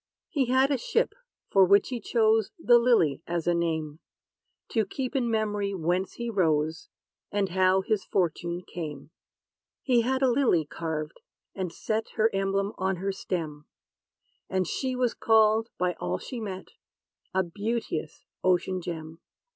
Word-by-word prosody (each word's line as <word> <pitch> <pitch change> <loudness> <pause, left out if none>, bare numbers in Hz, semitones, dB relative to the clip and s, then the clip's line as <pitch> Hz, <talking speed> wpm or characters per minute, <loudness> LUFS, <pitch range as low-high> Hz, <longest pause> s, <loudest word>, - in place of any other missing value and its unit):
He 280 -5 +1
had 260 +3 +3
a 275 - +1
ship, - - 0 0.4
for 195 - +6
which 200 +2 +5
he 250 -2 -3
chose 220 -1 +2
"The 240 -7 +5
LILY" 225 - +3
as 170 -1 -2
a 175 - +3
name, 160 -3 -1 0.7
To 225 - +2
keep 255 +6 -4
in 245 -3 +1
memory 210 -3 0
whence 180 +2 -1
he 235 - -5
rose, 160 -7 0 0.4
And 200 -2 0
how 185 +1 +3
his 200 0 0
fortune 175 -1 -1
came.' 150 -4 -7 0.7
He 245 -3 +3
had 260 +3 0
a 260 - +4
lily 235 - +3
carved, 155 0 -4 0.3
and 185 -3 -3
set, 220 +5 -3
Her 220 0 +2
emblem, 195 +1 0
on 190 0 +1
her 195 +3 -2
stem; 160 -6 -4 0.8
And 185 -1 +1
she 255 - -2
was 250 -2 +1
called, 220 0 +3
by 180 0 +1
all 90 +1 -1
she 245 - -7
met, 190 -4 -6 0.7
A 190 - +3
beauteous 200 -4 -4 0.2
ocean 185 0 +2
gem. 165 -2 -6
190 Hz, 150 wpm, -27 LUFS, 170-225 Hz, 0.8 s, for